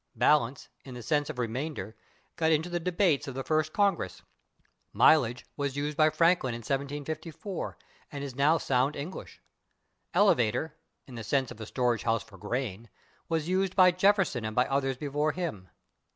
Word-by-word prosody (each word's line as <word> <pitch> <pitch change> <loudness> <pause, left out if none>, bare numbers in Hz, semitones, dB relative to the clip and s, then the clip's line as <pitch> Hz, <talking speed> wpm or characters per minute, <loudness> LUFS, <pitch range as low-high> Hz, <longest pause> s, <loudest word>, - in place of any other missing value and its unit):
/Balance/, 135 +1 +2 0.2
in 130 -2 -9
the 120 - -8
sense 145 +3 0
of 155 - -6
remainder, 120 -2 -4 0.4
got 160 -1 +2
into 160 +2 +1
the 175 - 0
debates 170 -4 +1
of 135 - -6
the 135 - -3
First 155 +3 0
Congress. 195 - 0 0.7
/Mileage/ 125 -6 +4
was 140 -2 -2
used 145 +1 -2
by 155 0 +5
Franklin 165 -7 +2
in 120 - -7
1754, 150 - -4 0.3
and 140 -2 -5
is 140 -2 -5
now 145 +5 +3
sound 135 0 +1
English. 155 +7 -7 0.7
/Elevator/, 155 - +3 0.3
in 130 - -13
the 115 -2 -6
sense 130 +3 0
of 115 -2 -10
a 110 - -6
storage 120 -3 0
house 115 0 0
for 95 - -16
grain, 115 -1 -4 0.4
was 160 -1 -1
used 185 +1 0
by 185 -1 +7
Jefferson 185 - +2
and 110 0 -4
by 125 - +4
others 135 -1 0
before 150 +2 -1
him. 150 - -5
140 Hz, 165 wpm, -29 LUFS, 125-160 Hz, 0.7 s, by